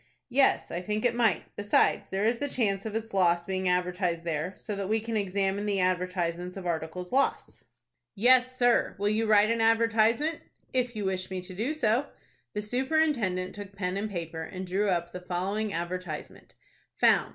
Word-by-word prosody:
"Yes, 270 Hz, +2 st, +3 dB
I 175 Hz, -, -3 dB
think 210 Hz, +4 st, -2 dB
it 240 Hz, -, +3 dB
might. 230 Hz, -6 st, +2 dB
Besides, 205 Hz, 0 st, +2 dB
there 195 Hz, +1 st, -1 dB
is 230 Hz, +1 st, +1 dB
the 285 Hz, -, -1 dB
chance 205 Hz, -5 st, 0 dB
of 215 Hz, -, -6 dB
its 225 Hz, -1 st, -4 dB
loss 175 Hz, -3 st, +3 dB
being 190 Hz, -1 st, -1 dB
advertised 180 Hz, -1 st, 0 dB
there, 165 Hz, +2 st, -2 dB
so 210 Hz, -, -5 dB
that 200 Hz, -1 st, -4 dB
we 220 Hz, +1 st, +2 dB
can 225 Hz, +1 st, -4 dB
examine 200 Hz, 0 st, 0 dB
the 200 Hz, -2 st, +1 dB
advertisements 180 Hz, -1 st, -1 dB
of 190 Hz, -, -7 dB
articles 170 Hz, +1 st, -3 dB
lost." 275 Hz, +2 st, 0 dB, 0.5 s
"Yes, 255 Hz, +4 st, +4 dB
sir; 245 Hz, -2 st, +3 dB
will 205 Hz, +1 st, +1 dB
you 220 Hz, +1 st, +1 dB
write 215 Hz, 0 st, +5 dB
an 230 Hz, 0 st, 0 dB
advertisement?" 230 Hz, +6 st, +3 dB, 0.3 s
"If 250 Hz, -2 st, 0 dB
you 210 Hz, -2 st, -3 dB
wish 185 Hz, -1 st, -2 dB
me 190 Hz, -1 st, -3 dB
to 180 Hz, +1 st, -9 dB
do 235 Hz, +11 st, -2 dB
so." 245 Hz, 0 st, +1 dB, 0.5 s
The 210 Hz, -, -2 dB
superintendent 245 Hz, -7 st, 0 dB
took 205 Hz, -1 st, -9 dB
pen 180 Hz, -1 st, -2 dB
and 205 Hz, +2 st, -2 dB
paper, 165 Hz, -4 st, -5 dB
and 185 Hz, +3 st, -6 dB
drew 195 Hz, +3 st, 0 dB
up 175 Hz, -1 st, 0 dB
the 180 Hz, -, -7 dB
following 195 Hz, +4 st, -2 dB
advertisement:— 175 Hz, -2 st, -5 dB, 0.4 s
"FOUND. -, -, +4 dB
200 Hz, 185 wpm, -28 LUFS, 180-225 Hz, 0.5 s, write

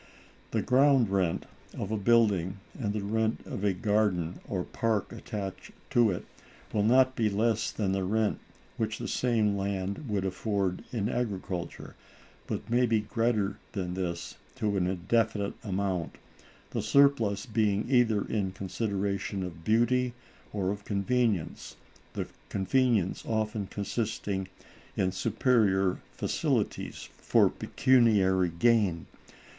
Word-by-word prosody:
The -, -, -1 dB
ground 130 Hz, -4 st, +4 dB
rent 95 Hz, -4 st, +1 dB, 0.3 s
of 100 Hz, -, -3 dB
a -, -, +1 dB
building, 100 Hz, -4 st, +3 dB, 0.2 s
and 105 Hz, -5 st, -2 dB
the 105 Hz, -1 st, -3 dB
rent 110 Hz, +2 st, 0 dB
of 100 Hz, -, -5 dB
a 100 Hz, -, +3 dB
garden 95 Hz, -3 st, 0 dB
or 90 Hz, -3 st, -2 dB
park 110 Hz, +1 st, -1 dB
attached 100 Hz, -4 st, -6 dB, 0.2 s
to 120 Hz, -2 st, +5 dB
it, 90 Hz, -, -3 dB, 0.5 s
will 105 Hz, -, +2 dB
not 130 Hz, +4 st, +4 dB
be 110 Hz, -3 st, +2 dB
less 110 Hz, +2 st, +1 dB
than 100 Hz, -3 st, -1 dB
the 95 Hz, 0 st, 0 dB
rent 105 Hz, +3 st, +1 dB, 0.4 s
which -, -, -1 dB
the -, -, -5 dB
same 110 Hz, -5 st, +1 dB
land 100 Hz, +5 st, -3 dB
would 100 Hz, -2 st, 0 dB
afford 95 Hz, -1 st, -1 dB
in 105 Hz, -4 st, -1 dB
agriculture, 100 Hz, -7 st, -4 dB, 0.5 s
but -, -, -4 dB
may 120 Hz, +1 st, +3 dB
be 110 Hz, -2 st, +2 dB
greater 105 Hz, -2 st, 0 dB
than 90 Hz, -3 st, -3 dB
this 90 Hz, -2 st, -4 dB, 0.2 s
to 105 Hz, -1 st, -1 dB
an 90 Hz, -2 st, +1 dB
indefinite 100 Hz, +3 st, 0 dB
amount; 95 Hz, -5 st, -2 dB, 0.5 s
the -, -, -1 dB
surplus 120 Hz, -8 st, +3 dB
being 105 Hz, -3 st, +1 dB
either 120 Hz, -5 st, +3 dB
in 100 Hz, -4 st, -1 dB
consideration 100 Hz, 0 st, -2 dB
of 85 Hz, -3 st, -7 dB
beauty 120 Hz, +4 st, +2 dB, 0.4 s
or 95 Hz, -2 st, -1 dB
of 100 Hz, 0 st, -5 dB
convenience, 105 Hz, -3 st, -1 dB, 0.4 s
the -, -, -2 dB, 0.2 s
convenience 105 Hz, -1 st, +1 dB
often 110 Hz, -2 st, -1 dB
consisting 100 Hz, -2 st, -3 dB, 0.5 s
in 95 Hz, -1 st, +2 dB
superior 95 Hz, -2 st, +2 dB
facilities -, -, -1 dB, 0.2 s
for -, -, +4 dB
pecuniary 100 Hz, -8 st, +3 dB
gain. 95 Hz, -1 st, +2 dB
105 Hz, 130 wpm, -29 LUFS, 95-115 Hz, 0.5 s, to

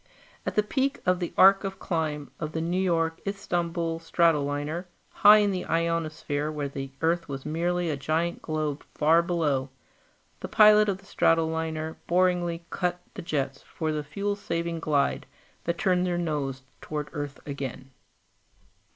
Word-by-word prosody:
At -, -, -2 dB
the 210 Hz, -, +4 dB
peak 265 Hz, +5 st, 0 dB
of 180 Hz, -1 st, +2 dB
the 175 Hz, -, -3 dB
arc 195 Hz, +1 st, +7 dB
of 195 Hz, -1 st, -4 dB
climb 155 Hz, -4 st, -2 dB
of 155 Hz, -1 st, -4 dB
the 160 Hz, -, -1 dB
New 175 Hz, +3 st, 0 dB
York 165 Hz, -3 st, +1 dB
Istanbul 170 Hz, -4 st, -2 dB
stratoliner, 160 Hz, 0 st, +1 dB, 0.3 s
high 210 Hz, +1 st, +7 dB
in 205 Hz, -1 st, +3 dB
the 185 Hz, -1 st, -2 dB
ionosphere 160 Hz, -2 st, -1 dB
where 150 Hz, -2 st, -3 dB
the 135 Hz, 0 st, -6 dB
Earth 165 Hz, 0 st, +1 dB
was 135 Hz, -1 st, -5 dB
merely 170 Hz, +2 st, 0 dB
a -, -, -1 dB
giant 160 Hz, +5 st, -1 dB
globe 155 Hz, -2 st, -2 dB
far 160 Hz, +3 st, +5 dB
below, 150 Hz, -6 st, 0 dB, 0.7 s
the -, -, -5 dB
pilot 210 Hz, -1 st, +6 dB
of 195 Hz, -, 0 dB
the 195 Hz, -, -20 dB
stratoliner 160 Hz, -2 st, 0 dB
boredly 175 Hz, -1 st, +1 dB
cut 180 Hz, -1 st, -1 dB
the -, -, -6 dB
jets 140 Hz, -5 st, -2 dB
for 160 Hz, -1 st, -3 dB
the 150 Hz, -1 st, -2 dB
fuel 200 Hz, +8 st, -2 dB
saving 170 Hz, -4 st, -3 dB
glide 145 Hz, -3 st, 0 dB, 0.4 s
that 170 Hz, 0 st, -1 dB
turned 180 Hz, -1 st, +2 dB
their 175 Hz, -1 st, 0 dB
nose 145 Hz, -6 st, -2 dB, 0.2 s
toward 150 Hz, -1 st, -4 dB
Earth 145 Hz, -1 st, -5 dB
again. 135 Hz, -2 st, -6 dB
165 Hz, 155 wpm, -27 LUFS, 150-180 Hz, 0.7 s, arc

